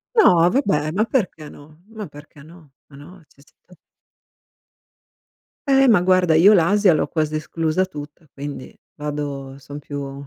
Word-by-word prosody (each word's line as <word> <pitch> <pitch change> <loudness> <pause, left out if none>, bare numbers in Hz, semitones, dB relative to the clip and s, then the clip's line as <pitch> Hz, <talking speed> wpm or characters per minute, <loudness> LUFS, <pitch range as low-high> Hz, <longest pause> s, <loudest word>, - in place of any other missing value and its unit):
No, 175 - +5
vabbè, 180 - 0
ma 205 +6 0
perché 180 - -3
no? 155 +3 -17
Ma 215 -2 -7
perché 145 -1 -15
no? 160 -1 -17 0.2
Ma 140 - -17
no 170 +5 -14
cioè 140 - -25
se - - -29
te 180 - -20 1.9
Eh 270 -1 +4
ma 210 - +5
guarda, 180 -2 +2
io 180 +7 +6
l'Asia 195 +1 +3
l'ho - - 0
quasi 155 -1 -2
esclusa 160 +3 -1
tutta, 150 -3 -10
quindi, 145 -1 -8 0.2
vado 145 -2 -6
son 145 +1 -10
più 140 -1 -7
155 Hz, 150 wpm, -20 LUFS, 145-185 Hz, 1.9 s, io